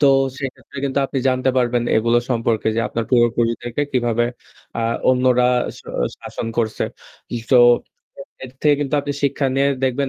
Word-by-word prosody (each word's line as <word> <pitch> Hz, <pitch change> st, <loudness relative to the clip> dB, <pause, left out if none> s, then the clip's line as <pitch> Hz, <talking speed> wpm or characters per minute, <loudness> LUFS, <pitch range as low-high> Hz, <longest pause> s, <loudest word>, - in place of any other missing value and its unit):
তো 145 Hz, -, +5 dB, 0.3 s
সেক্ষেত্রে 135 Hz, +1 st, -7 dB
কিন্তু 135 Hz, 0 st, -1 dB
আপনি 135 Hz, -, -3 dB
জানতে 130 Hz, 0 st, +1 dB
পারবেন 120 Hz, -1 st, +1 dB
এগুলো 115 Hz, +2 st, +3 dB
সম্পর্কে 115 Hz, -2 st, 0 dB
যে -, -, +2 dB
আপনার 115 Hz, -1 st, -2 dB
পূর্বপুরুষদেরকে 120 Hz, +1 st, +1 dB
কিভাবে 120 Hz, -2 st, +1 dB, 0.5 s
আ -, -, -2 dB, 0.3 s
অন্যরা 125 Hz, -1 st, +3 dB, 0.3 s
শ -, -, -13 dB, 0.4 s
শাসন -, -, -6 dB
করছে। 110 Hz, -2 st, 0 dB, 0.7 s
তো 130 Hz, -, +6 dB, 0.9 s
এর 130 Hz, -, -7 dB
থেকে 150 Hz, -1 st, +4 dB
কিন্তু 145 Hz, 0 st, -1 dB
আপনি 145 Hz, 0 st, -3 dB
শিক্ষা 140 Hz, 0 st, +1 dB
নিয়ে 140 Hz, +1 st, +3 dB, 0.2 s
দেখবেন 130 Hz, +1 st, 0 dB
125 Hz, 150 wpm, -20 LUFS, 120-135 Hz, 0.9 s, তো